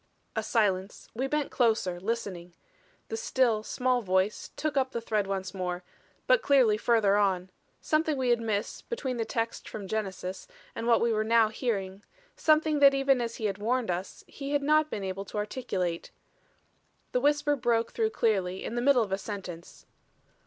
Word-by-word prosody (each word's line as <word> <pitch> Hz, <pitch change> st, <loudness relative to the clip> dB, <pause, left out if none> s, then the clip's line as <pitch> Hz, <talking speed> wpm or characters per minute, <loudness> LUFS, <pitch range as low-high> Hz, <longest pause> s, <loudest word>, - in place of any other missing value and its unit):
A 220 Hz, -, +1 dB
silence; 205 Hz, -3 st, 0 dB
we 260 Hz, +4 st, -1 dB
bent 300 Hz, 0 st, -1 dB
closer, 220 Hz, -7 st, +1 dB
listening; 185 Hz, -5 st, -4 dB, 0.5 s
the 450 Hz, -, -3 dB
still, 260 Hz, -, +1 dB
small 250 Hz, +2 st, 0 dB
voice 190 Hz, 0 st, 0 dB
took 310 Hz, -1 st, -2 dB
up 265 Hz, -1 st, +1 dB
the 235 Hz, -, -1 dB
thread 215 Hz, -3 st, -1 dB
once 190 Hz, -1 st, -3 dB
more 180 Hz, -1 st, -3 dB, 0.4 s
but -, -, +4 dB
clearly 260 Hz, -, +4 dB
further 215 Hz, -2 st, +3 dB
on. 190 Hz, -3 st, +1 dB, 0.3 s
Something 310 Hz, -1 st, +1 dB
we 255 Hz, -1 st, 0 dB
had 240 Hz, -1 st, +3 dB
missed 215 Hz, -2 st, -3 dB
between 265 Hz, -, -3 dB
that 225 Hz, -, -3 dB
text 230 Hz, 0 st, -3 dB
from 205 Hz, -3 st, -7 dB
Genesis 190 Hz, -, -4 dB, 0.3 s
and 230 Hz, -, -4 dB
what 235 Hz, -1 st, +4 dB
we 235 Hz, -1 st, +2 dB
were 215 Hz, 0 st, +1 dB
now 225 Hz, 0 st, +4 dB
hearing; 200 Hz, -4 st, -3 dB, 0.3 s
something 310 Hz, -1 st, +3 dB
that 280 Hz, -1 st, +7 dB
even 270 Hz, -2 st, +3 dB
as 230 Hz, -1 st, -3 dB
he 220 Hz, -, -4 dB
had 200 Hz, -1 st, -1 dB
warned 235 Hz, 0 st, 0 dB
us, 180 Hz, +2 st, -5 dB
he 280 Hz, 0 st, -6 dB
had 285 Hz, -1 st, +1 dB
not 305 Hz, +1 st, +3 dB
been 205 Hz, -, -4 dB
able 190 Hz, +1 st, -4 dB
to 210 Hz, -, -7 dB
articulate. 200 Hz, -6 st, -3 dB, 1.0 s
The 250 Hz, -, +1 dB
whisper 290 Hz, +1 st, +2 dB
broke 235 Hz, -3 st, +1 dB
through 445 Hz, -2 st, 0 dB
clearly 195 Hz, -, 0 dB
in -, -, -4 dB
the 240 Hz, -, -1 dB
middle 255 Hz, -2 st, +4 dB
of 200 Hz, -, -7 dB
a 195 Hz, -, 0 dB
sentence. 185 Hz, -5 st, -8 dB
225 Hz, 180 wpm, -28 LUFS, 195-260 Hz, 1.0 s, that